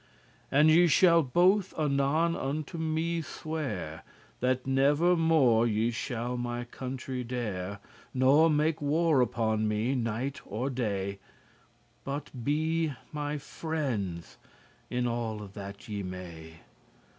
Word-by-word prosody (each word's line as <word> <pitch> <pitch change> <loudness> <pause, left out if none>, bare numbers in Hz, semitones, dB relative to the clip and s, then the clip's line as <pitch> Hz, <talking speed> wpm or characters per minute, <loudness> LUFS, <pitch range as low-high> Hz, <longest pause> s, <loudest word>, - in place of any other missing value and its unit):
And 150 +3 +6
ye 175 +2 +6
shall 170 +1 +5
both 180 +8 +2
anon 150 +3 +2
unto 150 +4 -3
me 160 +1 -1
swear, 140 - -5 0.4
That 130 0 0
never 145 +6 +3
more 140 -9 +4
ye 110 +1 +1
shall 120 +1 -3
my 120 0 -3
country 130 +1 -5
dere* 105 -6 -3
*injure - - -16 0.4
Nor 140 +5 +5
make 155 +1 +1
war 150 -1 +3
upon 110 -3 +1
me 110 +5 0
night 125 +2 -2
nor 125 +6 -2
day, 100 -5 -2 0.8
But 140 +2 -5
be 155 +2 0 0.2
my 150 -1 -3
friends 115 - -4 0.5
in 125 0 -1
alle 115 -3 -2
that 100 0 -8
ye 105 -2 -4
may. 85 -4 -8
130 Hz, 120 wpm, -29 LUFS, 110-155 Hz, 0.8 s, And